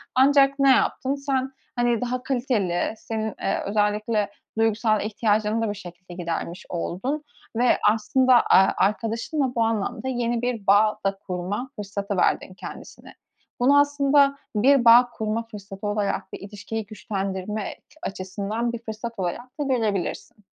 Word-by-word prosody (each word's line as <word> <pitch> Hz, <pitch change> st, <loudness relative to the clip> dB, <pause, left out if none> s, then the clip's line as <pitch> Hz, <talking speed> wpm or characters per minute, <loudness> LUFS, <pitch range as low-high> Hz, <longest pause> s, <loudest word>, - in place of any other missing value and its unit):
Ancak 275 Hz, +1 st, +5 dB
ne 275 Hz, 0 st, +5 dB
yaptın? 265 Hz, +1 st, +2 dB
Sen, 270 Hz, -2 st, -1 dB, 0.2 s
hani, 240 Hz, -2 st, +1 dB
daha 250 Hz, 0 st, -2 dB
kaliteli, 235 Hz, -10 st, 0 dB
senin, 220 Hz, -1 st, -4 dB
eee, -, -, 0 dB
özellikle 210 Hz, +1 st, 0 dB, 0.3 s
duygusal 220 Hz, -1 st, +2 dB
ihtiyacını 215 Hz, +1 st, 0 dB
da 225 Hz, -, 0 dB
bu 205 Hz, -, -3 dB
şekilde 180 Hz, -2 st, -11 dB
gidermiş 170 Hz, 0 st, -4 dB
oldun 220 Hz, -, -3 dB, 0.3 s
ve 245 Hz, +2 st, +3 dB
aslında, 255 Hz, +4 st, +2 dB
aaa, 195 Hz, -5 st, +5 dB
arkadaşınla 230 Hz, -, 0 dB
bu 230 Hz, -, +3 dB
anlamda 225 Hz, +3 st, -2 dB
yeni 240 Hz, -2 st, -1 dB
bir 240 Hz, -5 st, -3 dB
bağ 210 Hz, +2 st, +4 dB
da 195 Hz, 0 st, 0 dB
kurma 190 Hz, +7 st, -3 dB
fırsatı 200 Hz, 0 st, -4 dB
verdin 185 Hz, -, +1 dB
kendisine. -, -, -10 dB, 0.5 s
Bunu 275 Hz, +4 st, +5 dB
aslında 285 Hz, -1 st, +3 dB, 0.2 s
bir 255 Hz, +4 st, +4 dB
bağ 240 Hz, +1 st, +8 dB
kurma 220 Hz, 0 st, -2 dB
fırsatı 200 Hz, -1 st, -7 dB
olarak, 205 Hz, -2 st, -2 dB
bir -, -, -6 dB
ilişkiyi 205 Hz, +2 st, -6 dB
güçlendirme 200 Hz, -1 st, -4 dB
ç -, -, -23 dB
açısından 200 Hz, +5 st, -3 dB
bir 235 Hz, -, -4 dB
fırsat 225 Hz, +1 st, -6 dB
olarak 240 Hz, -, -4 dB
da -, -, +1 dB
görebilirsin. 220 Hz, -5 st, -2 dB
220 Hz, 140 wpm, -24 LUFS, 200-250 Hz, 0.5 s, bağ